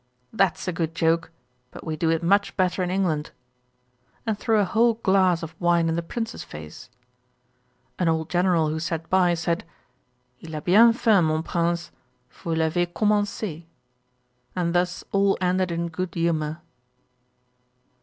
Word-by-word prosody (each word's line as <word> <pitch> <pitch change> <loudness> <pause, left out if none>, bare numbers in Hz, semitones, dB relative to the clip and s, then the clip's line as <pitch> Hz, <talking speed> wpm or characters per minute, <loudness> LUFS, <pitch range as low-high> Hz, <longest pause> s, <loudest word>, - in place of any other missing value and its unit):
'That's 195 -6 +1
a 180 - -1
good 165 -1 -3
joke; 165 0 +1 0.4
but - - -11
we 160 - -2
do 160 +1 0
it 165 0 +1
much 200 +4 +2
better 185 0 +1
in 180 - -1
England;' 180 -5 0 1.0
and 220 -2 0
threw 220 +1 +1
a 205 - +3
whole 230 +4 +3
glass 190 -5 +2
of 160 0 -6
wine 170 -1 +3
in 165 - 0
the 170 - -1
Prince's 225 +6 -5
face. 75 +7 -10 1.1
An 180 - +1
old 160 -1 0
General 175 -3 +2
who 155 +1 -2
sat 160 0 -3
by, 180 -2 +4
said, 170 +1 -1 0.8
'Il 160 -1 -9
a 150 - -4
bien 215 +9 +6
fait, 225 -4 +3
mon 155 -1 +1
Prince, 170 0 -1 0.4
vous 165 -1 -4
l'avez 165 +2 0
commencé:' 205 -4 -1 0.9
and 170 -2 0
thus 180 0 0
all 195 0 +2
ended 185 0 +1
in 170 0 -2
good 175 +2 -5
humour.' 160 -2 -1
175 Hz, 155 wpm, -24 LUFS, 165-190 Hz, 1.1 s, bien